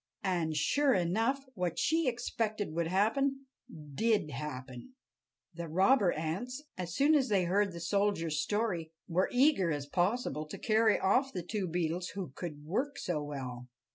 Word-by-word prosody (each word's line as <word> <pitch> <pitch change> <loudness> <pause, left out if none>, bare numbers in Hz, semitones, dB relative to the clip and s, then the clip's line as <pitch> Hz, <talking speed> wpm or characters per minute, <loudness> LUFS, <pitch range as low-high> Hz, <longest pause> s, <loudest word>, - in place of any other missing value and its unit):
And, 170 -5 0
sure 280 - +3
enough, 225 +10 +1
what 180 -5 -2
she 325 -1 +2
expected 220 -6 -2
would 170 0 0
happen 270 +9 +1 0.5
did 215 -3 +1
happen. 135 - -7 0.6
The 170 0 -6
robber 190 - +4
ants, 200 - -4
as 175 -2 -5
soon 290 +3 +4
as 270 -5 +3
they 195 -3 +3
heard 195 +3 +2
the 170 - -7
soldier's 165 -4 0
story, 185 -7 -1
were 180 +2 +1
as - - -9
eager 255 - +4
as 145 -2 -2
possible 175 - -1
to - - -7
carry 220 -1 +3
off 255 +8 +2
the 180 - -3
two 195 +1 -2
Beetles 175 +1 -1
who 185 -8 -4
could 150 -2 -7
work 250 - -1
so 165 -4 -2
well. 130 -4 -6
185 Hz, 160 wpm, -32 LUFS, 160-230 Hz, 0.6 s, robber